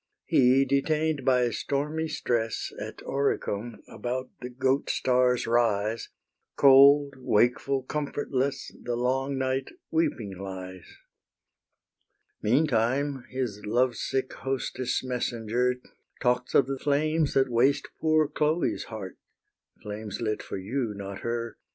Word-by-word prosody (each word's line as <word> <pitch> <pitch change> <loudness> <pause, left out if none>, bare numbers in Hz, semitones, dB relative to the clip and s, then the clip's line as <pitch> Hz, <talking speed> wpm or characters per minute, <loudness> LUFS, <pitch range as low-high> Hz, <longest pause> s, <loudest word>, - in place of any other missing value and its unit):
He, 130 +1 +4
detain'd 150 +2 +1
by 125 -2 +3
stormy 150 +7 -2
stress 120 -7 -2
At - - -7
Oricum, 120 -5 -2
about 130 +1 -4
the 125 - -5
Goat 130 +2 0
star's 125 -1 +2
rise, 115 -2 +1 0.5
Cold, 140 +1 +7
wakeful, 125 +3 +2
comfortless, 140 -1 -2
The 120 - -2
long 135 +3 0
night 130 0 -1 0.2
weeping 110 - -1
lies. 95 -2 -7 1.5
Meantime 130 +1 +1
his 120 -6 -4
lovesick 125 +4 0
hostess' 130 -1 -2
messenger 125 -1 -1 0.4
Talks 125 0 0
of 135 - +6
the 135 0 -4
flames 150 +2 +1
that 135 -1 +3
waste 135 +4 +2
poor 155 -1 +3
Chloe's 155 +3 0
heart 105 -5 -8 0.6
(Flames 105 -1 -6
lit 110 -2 -1
for - - -6
you, 110 +3 -3
not 100 -1 -6
her!) 115 0 -3
125 Hz, 110 wpm, -27 LUFS, 115-140 Hz, 1.5 s, Cold